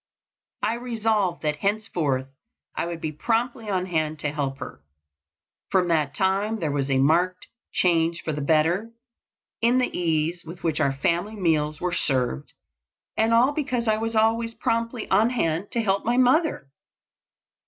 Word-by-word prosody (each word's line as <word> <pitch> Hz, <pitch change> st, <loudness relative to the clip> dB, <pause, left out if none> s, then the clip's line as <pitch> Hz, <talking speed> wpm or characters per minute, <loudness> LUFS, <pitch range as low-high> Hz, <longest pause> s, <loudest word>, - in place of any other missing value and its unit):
I 220 Hz, -, +2 dB
resolved 225 Hz, -7 st, -1 dB
that 150 Hz, -1 st, 0 dB
henceforth 165 Hz, -10 st, -1 dB, 0.5 s
I -, -, -1 dB
would 170 Hz, -1 st, -5 dB
be 155 Hz, -, -2 dB
promptly 230 Hz, -, -1 dB
on 185 Hz, -2 st, 0 dB
hand 155 Hz, -3 st, -1 dB
to 150 Hz, -, -1 dB
help 140 Hz, -2 st, -2 dB
her. 105 Hz, -, -8 dB, 0.9 s
From 180 Hz, -2 st, +2 dB
that 150 Hz, -4 st, +1 dB
time 195 Hz, +3 st, +1 dB
there 155 Hz, -5 st, -1 dB
was 140 Hz, -1 st, -1 dB
a 135 Hz, -, +2 dB
marked 170 Hz, +7 st, +2 dB, 0.3 s
change 170 Hz, -1 st, +1 dB
for 155 Hz, -, -2 dB
the 150 Hz, -, -3 dB
better 165 Hz, +9 st, +2 dB, 0.7 s
in 235 Hz, +2 st, +4 dB
the 255 Hz, -, 0 dB
ease 165 Hz, 0 st, 0 dB
with 170 Hz, +2 st, -10 dB
which 160 Hz, -3 st, 0 dB
our 140 Hz, -, +2 dB
family 170 Hz, +9 st, -1 dB
meals 155 Hz, -6 st, 0 dB
were 180 Hz, -1 st, -2 dB
served, 125 Hz, -, -1 dB, 0.6 s
and 220 Hz, +1 st, +2 dB
all 240 Hz, +4 st, +5 dB
because 255 Hz, -6 st, -2 dB
I 215 Hz, 0 st, +3 dB
was 225 Hz, +1 st, -3 dB
always 225 Hz, +1 st, +2 dB
promptly 230 Hz, 0 st, -1 dB
on 210 Hz, +4 st, +4 dB
hand 185 Hz, -6 st, -1 dB
to 235 Hz, -, +1 dB
help 195 Hz, -1 st, +1 dB
my 240 Hz, +2 st, +1 dB
mother. 255 Hz, -, +2 dB
180 Hz, 160 wpm, -25 LUFS, 155-225 Hz, 0.9 s, all